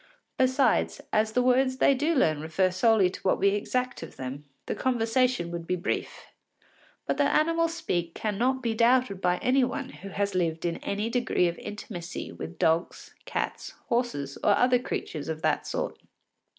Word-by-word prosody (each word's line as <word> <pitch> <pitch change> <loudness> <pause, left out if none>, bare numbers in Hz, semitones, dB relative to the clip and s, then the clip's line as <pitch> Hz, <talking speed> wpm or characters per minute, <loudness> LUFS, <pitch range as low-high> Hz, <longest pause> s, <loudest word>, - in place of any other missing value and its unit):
Besides, 260 -1 +2
as 215 +1 +2
the 250 - +2
words 260 +1 +3
they 275 - +5
do 300 +5 +1
learn 155 - +2
refer 170 +4 +1
solely 210 +1 +4
to - - -9
what 190 - +2
we 200 - +3
exact 250 +5 -1
of - - -9
them, 135 +3 -6 0.2
the - - -2
conversation 245 -5 +1
would 170 -1 -5
be 180 - +1
brief. 175 - -3 0.8
But - - -1
that - - +3
animals 330 +1 +1
speak 170 - -2
cannot 245 +5 0
be 230 -2 0
doubted 235 -3 +3
by 180 -1 +2
any 260 +1 +4
one 250 - -2
who 195 - -10
has 200 +1 -1
lived 165 -2 -1
in 170 -1 -1
any 210 +3 -3
degree 240 -7 +2
of 170 - -4
intimacy 180 -4 -7
with 170 +1 -8
dogs, 165 0 0
cats, - - -4
horses, 235 - -1
or - - +4
other 250 0 +4
creatures 155 -10 -4
of 160 0 -4
that - - +1
sort. - - -3
215 Hz, 175 wpm, -27 LUFS, 175-255 Hz, 0.8 s, they